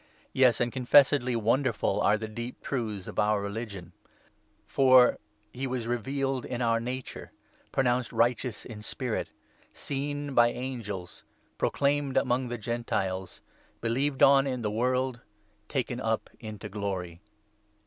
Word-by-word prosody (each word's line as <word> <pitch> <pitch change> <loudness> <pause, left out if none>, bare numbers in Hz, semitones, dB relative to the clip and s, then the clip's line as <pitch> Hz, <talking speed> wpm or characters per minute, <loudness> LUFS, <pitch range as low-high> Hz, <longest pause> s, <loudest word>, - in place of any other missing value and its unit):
Yes, 125 -3 +4
and 120 0 +1
confessedly 130 -1 +4
wonderful 115 +5 +1
are 105 - +4
the 110 - -5
16 110 - -10
deep 120 +1 -6
truths 110 -8 -3
of - - -4
our 105 0 +3
religion; 100 -3 -5 0.7
for 130 -2 +5
— 105 0 -41
' 105 0 -40
He 135 +2 -3
was 125 -2 -3
revealed 135 +2 -1
in 120 - -4
our 115 -2 +2
nature, 125 +2 -6 0.4
Pronounced 125 -2 +1
righteous 120 -1 0
in 110 -3 -8
spirit, 120 +2 -3 0.4
Seen 145 0 -4
by 120 -2 +6
angels, 110 -8 -6 0.4
Proclaimed 140 -1 +1
among 125 0 +1
the 120 0 -4
Gentiles, 105 -5 -3 0.4
Believed 130 +4 0
on 140 0 +6
in 125 -3 -2
the 105 - 0
world, 125 +2 0 0.5
Taken - - -2
up - - -1
into 110 -2 -7
glory.' 95 -4 -4
120 Hz, 140 wpm, -28 LUFS, 110-130 Hz, 0.7 s, by